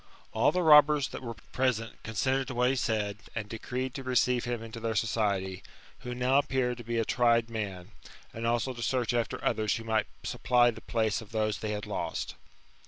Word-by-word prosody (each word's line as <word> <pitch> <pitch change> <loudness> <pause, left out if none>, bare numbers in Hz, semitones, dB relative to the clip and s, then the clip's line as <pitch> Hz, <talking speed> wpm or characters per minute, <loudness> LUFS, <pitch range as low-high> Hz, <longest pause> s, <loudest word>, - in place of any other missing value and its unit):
All 110 - +4
the 180 0 0
robbers 150 -2 +6
that - - -7
were 115 -2 -6 0.2
present, 125 -3 0
assented 130 +4 0
to 130 - -5
what 125 +1 +3
he - - 0
said, 105 -5 -1 0.2
and 110 -2 -3
decreed 125 +4 -4
to 135 - -5
receive 125 -1 +1
him 120 -2 -3
into 115 0 -8
their 115 -1 -2
society, 100 -4 0 0.4
who 125 0 -6
now 125 +3 +3
appeared 130 -4 0
to - - -7
be 115 +1 -2
a 115 - +1
tried 115 -1 +2
man, 100 -5 -5 0.4
and 115 +1 -3
also 120 +2 0
to 120 - -8
search 120 -1 0
after 120 -1 -2
others 110 -1 +1
who 115 - -5
might 110 -5 0 0.2
supply 120 -1 +3
the - - -11
place 110 -2 0
of 110 -1 -13
those 110 -1 0
they 110 - -3
had 105 0 -4
lost. - - -3
115 Hz, 200 wpm, -29 LUFS, 110-125 Hz, 0.4 s, robbers